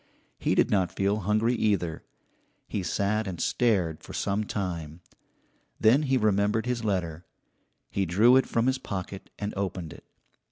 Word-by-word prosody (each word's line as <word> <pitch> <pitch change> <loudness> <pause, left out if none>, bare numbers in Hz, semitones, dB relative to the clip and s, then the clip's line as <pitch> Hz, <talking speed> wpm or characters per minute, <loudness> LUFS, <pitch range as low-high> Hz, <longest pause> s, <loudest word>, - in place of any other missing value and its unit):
He - - +1
did - - +3
not 95 -3 +2
feel 100 +2 +1
hungry, 110 +4 +1
either. 100 -8 0 0.6
He 100 - -2
sat 100 +3 0
and 90 -3 -5
stared 95 -10 +1
for - - -11
some 100 +2 -1
time. 85 -6 -4 0.8
Then 115 +7 +5
he 135 -3 +1
remembered 105 0 +2
his 125 -2 -2
letter. 90 -6 -2 0.7
He 95 -2 0
drew 110 +9 +5
it 130 - +4
from 115 0 +1
his 130 0 +1
pocket 95 -1 -6
and 105 0 -4
opened 90 -4 -3
it. - - -16
100 Hz, 155 wpm, -27 LUFS, 90-110 Hz, 0.8 s, Then